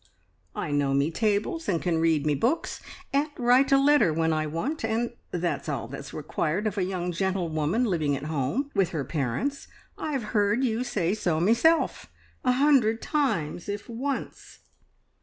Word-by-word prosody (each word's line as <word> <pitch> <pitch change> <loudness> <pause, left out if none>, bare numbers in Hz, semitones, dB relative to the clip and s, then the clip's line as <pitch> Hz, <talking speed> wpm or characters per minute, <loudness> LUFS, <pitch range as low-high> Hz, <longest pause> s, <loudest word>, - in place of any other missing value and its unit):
"I - - -3
know 140 -1 +1
me 140 +4 +2
tables 215 - 0
and 170 -4 +1
can 170 -2 0
read 160 -3 +2
me 150 - +2
books, 240 - -1 0.3
and 285 +2 +2
write 250 +2 +4
a 275 - +7
letter 280 - +4
when 160 +1 +1
I 155 0 0
want, 240 - -3
and 235 +2 -1 0.2
that's 175 -2 -2
all 130 -6 -3
that's 135 +2 -8
required 155 +5 -2
of 215 - -1
a - - +1
young 180 -1 -2
gentlewoman 175 +1 0
living 160 - +1
at 140 - -8
home 155 - -2
with 190 -3 +2
her 145 -4 -2
parents. 150 - -2 0.3
I've 280 -6 -2
heard 210 +3 +2
you 235 -1 0
say 190 -7 0
so 175 -7 0
meself 235 - +2 0.4
a 250 - +3
hundred 255 -5 +3
times, 205 - -1
if 205 0 -4
once." 255 +4 -5
190 Hz, 165 wpm, -27 LUFS, 155-250 Hz, 0.4 s, a